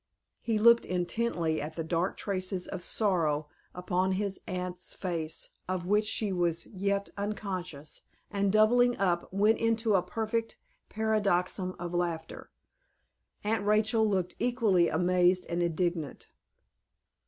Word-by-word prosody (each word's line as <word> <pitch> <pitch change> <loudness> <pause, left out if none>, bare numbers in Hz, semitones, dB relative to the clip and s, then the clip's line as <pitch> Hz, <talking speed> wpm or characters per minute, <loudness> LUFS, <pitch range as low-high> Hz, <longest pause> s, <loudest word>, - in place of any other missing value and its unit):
He 225 -2 0
looked 235 +2 +6
intently 175 -3 -1
at 155 +2 -6
the 165 - -3
dark 170 +3 -1
traces 185 -2 -2
of 190 - -5
sorrow 165 -7 +1 0.3
upon 180 +1 0
his 195 0 -2
aunt's 180 0 -4
face, 165 -3 -3 0.2
of 185 -2 -2
which 210 +3 +2
she 210 -2 -1
was 170 -2 0
yet 200 0 -2
unconscious 185 -7 -4 0.3
and 200 -1 +1
doubling 245 +4 +4
up, 175 -3 0
went 205 +4 +3
into 225 -1 +1
a 190 - +4
perfect 225 +5 -3 0.3
paroxysm 200 -4 0
of 175 0 -5
laughter. 170 -2 -3 0.9
Aunt 215 0 0
Rachel 215 +2 +3
looked 190 -4 0
equally 225 -8 +3
amazed 180 +2 +2
and 170 +1 -1
indignant. 170 -2 -2
185 Hz, 125 wpm, -30 LUFS, 175-215 Hz, 0.9 s, looked